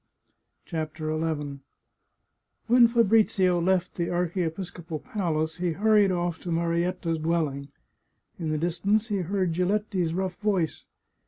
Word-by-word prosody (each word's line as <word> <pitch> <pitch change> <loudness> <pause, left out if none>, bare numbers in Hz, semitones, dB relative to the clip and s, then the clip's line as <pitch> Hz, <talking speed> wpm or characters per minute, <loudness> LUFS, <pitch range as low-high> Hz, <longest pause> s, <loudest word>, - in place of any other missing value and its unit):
CHAPTER 155 -1 -3
XI 150 -3 -2 1.1
When 240 0 +6
Fabrizio 210 -6 +3
left 185 0 +1
the 170 -1 -2
archiepiscopal 175 -1 -3
palace 160 -3 -2
he 175 -2 -1
hurried 210 0 +4
off 175 -2 -1
to 175 - -5
Marietta's 170 0 0
dwelling. 155 -4 -1 0.7
In 165 -2 -2
the 155 - 0
distance 195 +7 0
he 205 - 0
heard 185 -1 -1
Giletti's 185 -1 0
rough 185 -1 -2
voice. 195 -7 -1
175 Hz, 115 wpm, -26 LUFS, 160-195 Hz, 1.1 s, When